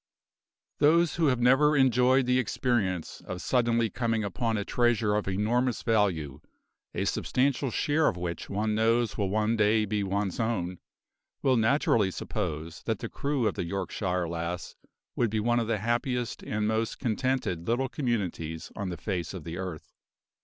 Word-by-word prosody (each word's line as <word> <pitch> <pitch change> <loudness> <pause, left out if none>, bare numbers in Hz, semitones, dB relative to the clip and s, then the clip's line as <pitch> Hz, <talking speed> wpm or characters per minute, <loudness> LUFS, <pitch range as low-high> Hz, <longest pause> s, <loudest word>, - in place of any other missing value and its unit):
Those 165 +3 +4
who 165 -2 +3
have 125 -3 +2
never 140 +5 +4
enjoyed 130 0 +4
the 125 +1 +3
experience 110 -8 -1
of 90 - -4
suddenly 115 0 +2
coming 115 -2 0
upon 110 +4 -1
a 100 - -2
treasure 120 -3 +2
of 105 -1 0
enormous 115 +6 0
value, 90 - 0 0.5
a - - 0
substantial 135 +1 0
share 150 +5 +1
of 90 - 0
which 85 -2 -4
one 105 +2 0
knows 115 +1 +2
will 100 -2 -1
one 110 +3 +1
day 110 0 +3
be 105 0 -1
one's 100 -1 -2
own, 90 -6 -1 0.6
will 130 -1 +4
naturally 115 -3 +3
suppose 80 -3 -4
that - - +1
the - - -6
crew 140 -4 -1
of 100 - 0
the - - -3
Yorkshire 90 -1 -2
Lass 85 +1 -4 0.4
would 120 - +1
be 110 +1 -1
one 120 +2 +2
of 115 - -1
the 115 -1 +1
happiest 120 +3 -1
and 105 0 -2
most 110 +1 -1
contented 115 -8 -1
little 120 +3 +1
communities 100 - -3
on 100 -3 -3
the 90 - -5
face 90 0 -3
of 90 - -7
the 85 +3 -6
earth. 90 -5 -6
110 Hz, 165 wpm, -28 LUFS, 95-125 Hz, 0.6 s, Those